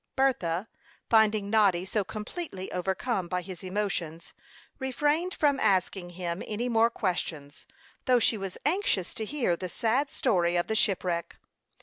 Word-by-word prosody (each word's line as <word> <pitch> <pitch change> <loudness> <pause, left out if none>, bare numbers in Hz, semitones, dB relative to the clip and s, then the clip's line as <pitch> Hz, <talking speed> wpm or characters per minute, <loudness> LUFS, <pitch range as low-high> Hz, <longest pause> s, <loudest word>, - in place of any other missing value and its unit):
Bertha, 220 -9 +1 0.4
finding 215 -2 +4
Noddy 195 -5 +4
so 205 +1 0
completely 210 - -6
overcome 190 +2 -1
by 180 0 -2
his 180 -1 -8
emotions, 185 -4 -3 0.5
refrained 295 +7 0
from 285 -3 +2
asking 185 -1 +1
him 175 0 -3
any 225 +3 -2
more 230 -1 +4
questions, 165 -9 -3 0.4
though 255 -2 +5
she 230 - +3
was 195 -3 -5
anxious 295 - +1
to 220 - -3
hear 240 -8 0
the 185 +1 -5
sad 250 +8 0
story 175 -3 +1
of 175 - +2
the 220 - -2
shipwreck. 180 -5 0
200 Hz, 140 wpm, -28 LUFS, 180-235 Hz, 0.5 s, though